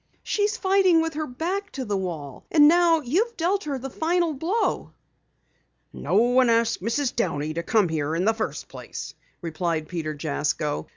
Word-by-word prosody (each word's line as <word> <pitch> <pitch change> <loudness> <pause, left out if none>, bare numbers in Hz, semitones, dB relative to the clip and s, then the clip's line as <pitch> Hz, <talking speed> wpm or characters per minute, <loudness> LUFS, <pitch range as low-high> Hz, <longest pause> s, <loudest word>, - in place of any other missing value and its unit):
"She's 420 +2 0
fighting 380 -4 +4
with 325 0 -3
her 305 +1 -3
back 365 +10 -3
to 265 -3 -4
the 205 -2 -1
wall. 160 -8 -5
And 295 -2 +6
now 335 0 +4
you've 380 - 0
dealt 370 +3 0
her 285 -3 -2
the 265 +1 -7
final 335 +2 0
blow." 345 +11 -1 1.0
"No - - -3
one 245 +3 +4
asked 230 -3 +2
Mrs. 240 +6 -1
Downey 155 -9 -1
to 170 - -2
come 205 +3 +2
here 155 -1 -2
in 175 +3 0
the 225 - +4
first 220 -1 -4
place," - - -8 0.3
replied 165 -1 -2
Peter 155 -3 -4
Jasko. 75 - -2
250 Hz, 170 wpm, -24 LUFS, -, 1.0 s, And